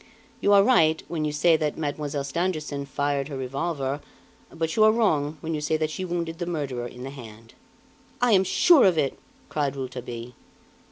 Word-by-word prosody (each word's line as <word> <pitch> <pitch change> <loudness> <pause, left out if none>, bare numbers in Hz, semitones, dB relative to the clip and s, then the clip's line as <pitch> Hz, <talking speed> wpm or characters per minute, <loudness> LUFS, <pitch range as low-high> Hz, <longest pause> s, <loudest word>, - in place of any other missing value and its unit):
You 200 - +2
are 200 -1 +7
right, 160 -9 +3
when 160 -3 -2
you 150 - -1
say 160 +3 +4
that 150 -1 -2
Mademoiselle 145 -2 -3
Stangerson 150 -2 -2
fired 145 -1 -1
her 140 -3 -6
revolver, 140 +1 -3 0.5
but 160 -1 -3
you 215 - +5
are 215 - +7
wrong 160 -10 +1
when 160 0 -3
you 150 - -2
say 155 +1 0
that 155 0 -1
she 185 +4 -4
wounded 170 -2 -3
the 175 - -3
murderer 135 -8 -3
in 125 +1 -10
the 135 - -6
hand." 115 -4 -12 0.7
"I 245 -1 +3
am 190 -3 +5
sure 335 - +5
of 180 -4 +4
it," 140 -3 0 0.3
cried 145 -3 -1
Rouletabille. 125 -2 -6
150 Hz, 185 wpm, -25 LUFS, 140-170 Hz, 0.7 s, are